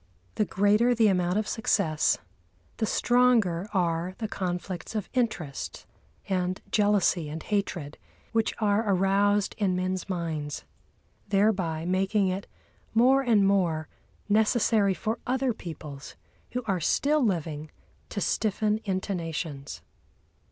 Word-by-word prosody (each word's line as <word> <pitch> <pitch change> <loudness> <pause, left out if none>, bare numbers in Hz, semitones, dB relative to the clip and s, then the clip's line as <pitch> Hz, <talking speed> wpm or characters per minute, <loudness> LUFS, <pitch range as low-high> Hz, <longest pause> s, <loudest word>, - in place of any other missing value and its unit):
The 215 - +1
greater 210 +6 +3
the 220 -2 +4
amount 180 0 +1
of 215 0 0
success, 190 -8 +1 0.6
the 220 - 0
stronger 225 -8 +2
are 175 -1 0
the 220 - -3
conflicts 180 0 -4
of 210 -3 -2
interest 205 - -2 0.4
and 185 -1 -1
jealousy 205 -6 +2
and 155 +1 -6
hatred 180 -8 -2 0.3
which 225 -1 +1
are 210 0 +2
aroused 200 +2 +2
in 190 -3 +1
men's 185 +1 -2
minds, 160 -5 -3 0.6
thereby 195 -6 +1
making 190 +2 +1
it 190 +2 -3 0.5
more 260 +4 +5
and 225 -6 +3
more 175 -5 +1 0.4
necessary 215 -1 +3
for 220 +3 -2
other 260 0 +1
peoples, 155 -8 -9 0.4
who 250 0 -2
are 195 -4 0
still 290 - +2
living, 160 -7 -1 0.4
to - - -4
stiffen 215 +1 0
into 190 0 -1
nations. 160 -5 -5
195 Hz, 120 wpm, -27 LUFS, 175-215 Hz, 0.6 s, more